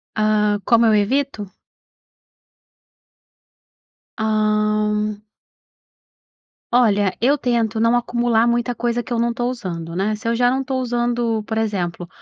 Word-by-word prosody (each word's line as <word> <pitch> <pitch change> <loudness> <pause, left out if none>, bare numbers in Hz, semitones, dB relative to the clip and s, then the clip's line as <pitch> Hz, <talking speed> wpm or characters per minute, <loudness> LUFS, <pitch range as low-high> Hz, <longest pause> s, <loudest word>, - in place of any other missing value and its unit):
Hã, 210 -1 +2
como 235 -1 +4
eu 220 - +4
evito? 215 -1 -1 2.7
Hã. 215 -1 0 1.5
Olha, 205 -6 +2
eu 270 +5 +3
tento 235 -5 -1
não 230 +2 +3
acumular 240 -1 +1
muita 240 +1 0
coisa 240 +1 -1
que 245 - -13
eu 235 - 0
não 235 0 0
tô 240 +1 -2
usando, 170 -9 -6
né. 200 +3 0
Se 215 - -8
eu 230 - +1
já 245 +1 +3
não 265 - 0
estou 265 -1 -3
usando, 240 -2 -1
por 220 +1 -5
exemplo, 180 -6 -2
225 Hz, 130 wpm, -20 LUFS, 210-240 Hz, 2.7 s, como